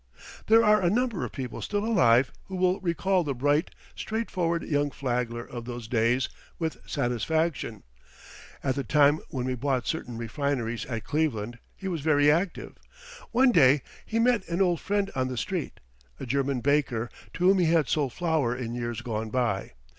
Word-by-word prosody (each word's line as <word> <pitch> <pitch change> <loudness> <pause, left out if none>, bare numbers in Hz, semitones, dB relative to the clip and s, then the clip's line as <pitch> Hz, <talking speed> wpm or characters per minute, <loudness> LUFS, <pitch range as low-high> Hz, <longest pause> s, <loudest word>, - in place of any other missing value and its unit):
There 225 +1 +6
are 210 -1 +5
a 175 - +3
number 230 -2 0
of - - -4
people 130 -3 -6
still 205 0 -2
alive 130 - +4
who 190 - -7
will 185 0 +2
recall 185 +1 +1
the 140 -4 -2
bright, 145 +6 +1 0.3
straightforward 180 -7 -2
young 145 -1 0
Flagler 120 -3 -2
of 120 -1 -8
those 120 -2 -6
days 120 +2 +2 0.3
with 160 -2 -2
satisfaction. 140 - -1 0.8
At 135 - +1
the 140 - -3
time 145 +5 +4
when 125 -2 -3
we 130 - -1
bought 130 -1 -1
certain 125 -8 -3
refineries 120 0 -2
at 115 -4 -4
Cleveland 120 -7 -1 0.2
he 195 - -7
was 170 -5 -2
very 145 -1 +4
active. 170 +4 -2 0.5
One 250 +2 +4
day 135 - +5 0.2
he 225 - -3
met 235 -3 +3
an 170 +1 -1
old 175 -4 +2
friend 200 -1 0
on 130 -1 0
the 130 -1 -5
street, - - -3 0.4
a - - -5
German 135 0 0
baker, 135 -5 +1 0.2
to 180 - 0
whom 190 0 +5
he 175 - +3
had 160 -4 +3
sold 145 -4 0
flour 155 -7 0
in 120 -2 -4
years 120 -1 -3
gone 110 -2 -3
by. 115 - -1
140 Hz, 175 wpm, -27 LUFS, 120-175 Hz, 0.8 s, There